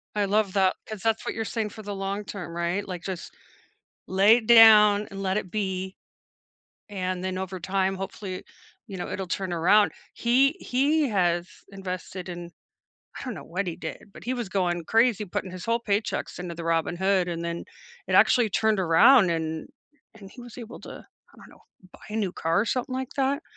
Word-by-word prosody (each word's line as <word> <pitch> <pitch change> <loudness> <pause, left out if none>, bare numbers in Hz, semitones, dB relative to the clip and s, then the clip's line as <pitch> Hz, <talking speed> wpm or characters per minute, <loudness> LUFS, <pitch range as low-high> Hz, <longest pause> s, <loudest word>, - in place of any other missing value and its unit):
I 205 - +1
love 200 -1 +1
that, 190 -2 +3
'cause 215 -3 -7
that's 225 +1 0
what - - -2
you're 225 - -2
saying 220 -1 -2
for 215 +1 -11
the 205 0 -5
long 195 +1 -3
term, 180 -5 -7
right? 170 +4 -1
Like, 180 -3 -6
just 185 -3 -6 0.7
lay 200 +5 +5
it 220 - -6
down 215 -3 +8
and 195 0 -7
let 190 +1 0
it 190 - -4
be, 190 -2 -3 0.9
and 185 -2 -3
then 185 0 -3
over 190 0 -5
time, 190 +1 0
hopefully, 190 -1 -6 0.4
you 195 -4 -7
know, 175 - -5
it'll 190 - -4
turn 185 0 -3
around. 185 +5 +4 0.2
He 260 +4 +3
he 285 +4 +1
has 175 -3 +1 0.2
invested 185 -1 -6
in 175 0 -7 0.7
I - - -7
don't 250 -5 -4
know 155 - -8
what 185 +6 -3
he 170 - -3
did, 200 - -8
but - - -13
he 250 - -1
was 240 -5 -3
going 175 -3 -1
crazy 225 0 +2
putting 185 +1 -4
his 185 0 -8
whole 230 +1 +1
paychecks 210 -1 -2
into 180 -1 -5
the 170 - -7
Robinhood, 175 +3 +1
and 170 -1 -4
then 170 0 -4 0.4
it - - -1
actually 240 -3 +5
turned 215 +1 +1
around 185 +6 +6
and 160 - -3 0.5
and 200 -3 -13
he 245 - -13
was 240 -1 -11
able 235 0 -9
to - - -11 0.3
I - - -21
don't - - -15
know, - - -19 0.3
buy - - -16
a 215 - -5
new 200 -5 -1
car 165 +2 0
or - - -2
something 255 +2 -2
like 260 0 -4
that, 275 +2 0
195 Hz, 200 wpm, -26 LUFS, 180-220 Hz, 0.9 s, down